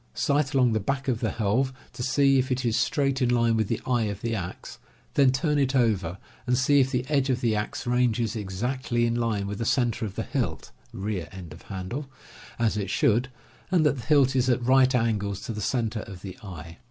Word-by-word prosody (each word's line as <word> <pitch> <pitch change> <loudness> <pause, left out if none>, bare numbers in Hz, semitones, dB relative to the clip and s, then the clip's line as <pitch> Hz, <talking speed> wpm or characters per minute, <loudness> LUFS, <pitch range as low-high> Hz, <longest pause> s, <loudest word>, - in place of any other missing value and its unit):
Sight 145 0 +1
along 125 -3 +4
the 110 - +1
back 135 +6 -2
of 120 -4 0
the 110 - 0
helve 115 +6 0 0.2
to - - -7
see 135 +1 +3
if 130 +1 -1
it 130 0 -1
is 115 -2 +1
straight 135 0 +1
in 125 - +3
line 115 -1 +3
with 110 -2 +1
the - - -1
eye 120 -3 +1
of 100 -1 -4
the 115 0 -2
axe, 90 -5 -6 0.3
then 135 -2 +5
turn 150 +2 +1
it 135 -1 +1
over 100 -8 +1 0.3
and 125 0 +2
see 140 +2 +4
if 130 -1 +3
the 125 -2 -1
edge 140 -2 +1
of 125 -1 +1
the 115 -3 +1
axe 105 0 -3
ranges 120 -2 +1
exactly 120 +4 -1
in 115 - +1
line 115 -4 -1
with 100 0 -5
the - - -1
center 120 0 +1
of 100 -3 -4
the 110 - -2
hilt 110 - -3 0.2
(rear 95 -5 -4
end 90 -5 -9
of - - -13
handle), 105 +9 -6 0.5
as 115 -2 +1
it 100 -1 -2
should, 120 +4 +2 0.4
and 175 -4 +3
that 145 -2 +2
the - - -9
hilt 140 -3 +4
is 130 0 +2
at 120 -1 +1
right 130 0 +5
angles 105 -4 0
to 115 - -5
the 105 - -5
cen 120 -1 0
ter 110 - -4
of 100 -4 -9
the 95 -2 -7
eye. 85 -5 -9
120 Hz, 230 wpm, -26 LUFS, 105-130 Hz, 0.5 s, then